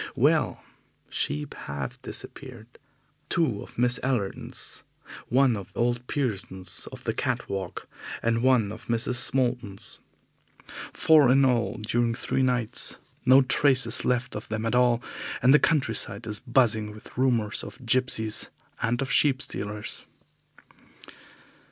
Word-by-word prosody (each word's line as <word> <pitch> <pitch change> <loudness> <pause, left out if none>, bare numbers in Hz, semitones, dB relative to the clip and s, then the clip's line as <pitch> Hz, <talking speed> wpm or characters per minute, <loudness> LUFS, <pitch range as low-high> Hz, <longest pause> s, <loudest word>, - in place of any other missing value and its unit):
Well, - - +2 0.5
sheep 75 +1 -2
have 70 -2 -6
disappeared. 120 -4 -7 0.5
Two 135 -12 +1
of - - -12
Miss 125 +1 +2
Allerton's, 125 -7 -2 0.5
one 130 -1 +4
of 100 -3 -7
old 120 +1 0
Pearson's 95 -8 -3
of - - -10
the - - -1
Cat - - -2
Walk, 95 -2 -5 0.4
and 115 0 +1
one 125 -5 +3
of 110 +2 -10
Mrs. 120 +1 +1
Moulton's. 120 -6 -1 0.9
Four 150 -5 +5
in 135 +1 +5
all 120 -3 +1
during 115 +2 0
three 135 - -1
nights. 125 -3 -1 0.3
No 130 +2 +8
trace 135 0 +3
is 115 - -2
left 125 0 0
of 105 - -6
them 110 0 -2
at 115 - 0
all, 125 -1 +3 0.4
and 130 +2 +5
the 150 - +7
countryside 115 -8 +1
is 105 -1 -2
buzzing 120 -4 +2
with 105 0 -13
rumours 120 -4 +1
of 130 - -10
gipsies 115 -3 +1 0.3
and 120 +3 0
of 135 - -4
sheep 135 -3 +4
stealers. 105 -6 -5
120 Hz, 135 wpm, -26 LUFS, 110-130 Hz, 0.9 s, No